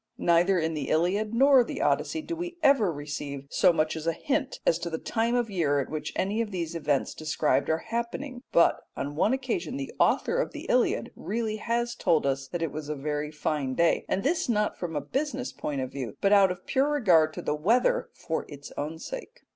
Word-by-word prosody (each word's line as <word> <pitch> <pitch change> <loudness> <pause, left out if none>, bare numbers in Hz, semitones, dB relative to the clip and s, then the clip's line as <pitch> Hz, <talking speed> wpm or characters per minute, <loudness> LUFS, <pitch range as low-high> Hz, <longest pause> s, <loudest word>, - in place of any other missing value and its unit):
Neither 175 +3 +3
in 160 -1 0
the 150 -3 -3
Iliad 190 +7 +1
nor 270 0 +6
the - - -6
Odyssey 320 -1 0
do 335 - -4
we 350 +1 -5
ever 245 - +5
receive 145 -2 -5
so - - +5
much 155 -1 0
as 160 0 -5
a 165 - +2
hint 280 - -2
as 165 - +3
to 175 - -4
the 160 - -3
time 230 +5 0
of 240 -3 0
year 150 -7 +1
at 135 - -3
which 155 -1 -4
any 205 +4 0
of 225 - -2
the 185 -4 -2
events 155 -4 -1
described 155 -1 0
are 160 - +3
happening; 245 +3 -3
but 170 - +4 0.2
on 145 +1 -4
one 190 +8 +2
occasion 260 0 -2
the 275 -1 -5
author 475 - +2
of - - -4
the - - -7
Iliad - - +2
really 220 -1 -2
has 235 +2 -1
told 170 -10 +1
us 135 0 -1
that 170 +3 -3
it 160 - -1
was 150 -1 -6
a 150 - -2
very 150 +1 -3
fine 150 -3 -2
day, 170 0 +3
and 195 - 0
this 305 0 0
not 210 -2 +1
from 170 -3 -5
a 145 - 0
business 270 - -3
point 140 -3 -3
of 130 - -4
view, 125 -7 -6
but 200 +1 +3
out 200 -2 +6
of 180 0 -6
pure 270 +2 +2
regard 180 - +4
to - - -6
the - - 0
weather 215 +12 +2
for 160 - -3
its 145 -1 -10
own 150 +3 -4
sake. - - -8
175 Hz, 220 wpm, -27 LUFS, 155-240 Hz, 0.2 s, nor